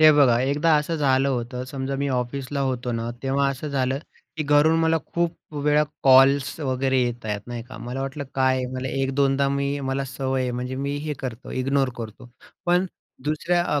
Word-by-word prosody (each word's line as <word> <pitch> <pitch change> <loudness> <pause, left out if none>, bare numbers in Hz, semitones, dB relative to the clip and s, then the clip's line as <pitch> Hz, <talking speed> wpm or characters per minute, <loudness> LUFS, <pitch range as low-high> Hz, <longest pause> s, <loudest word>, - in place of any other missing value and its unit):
हे 155 0 +9
बघा 135 -5 +5
एकदा 145 +5 +3
असं 150 +3 -1
झालं 135 -2 +3
होतं. 125 -1 -2
समजा 135 +1 -4
मी 140 +1 -1
ऑफिसला 130 +2 -2
होतो 125 -2 -1
ना, 115 0 -2
तेव्हा 140 +1 +2
असं 140 +3 -5
झालं 135 -1 0 0.4
की 155 - -1
घरून 150 +2 +4
मला 165 0 +3
खूप 170 -2 -3
वेळा 150 0 +4 0.2
कॉल्स 135 +2 +5
वगैरे 130 -1 +1
येत 120 -1 -3
आहेत, 105 -1 -2
नाही 120 -1 -5
का? - - -9
मला 120 +4 -5
वाटलं 135 +2 -4
काय 130 -1 +3
आहे 130 -1 -1
मला 130 +1 -3
एक-दोनदा 135 +1 +1
मी 140 +1 -1
मला 135 +1 -1
सवय 135 0 -2
आहे 125 - -1
म्हणजे 125 +1 -3
मी 140 +1 -2
हे 150 - -1
करतो, 125 -2 -6
इग्नोर 135 +1 +1
करतो. 115 +1 -8 0.4
पण 180 +2 +3 0.4
दुसऱ्या 170 +4 +1
अ, - - +1
135 Hz, 190 wpm, -24 LUFS, 130-145 Hz, 0.4 s, हे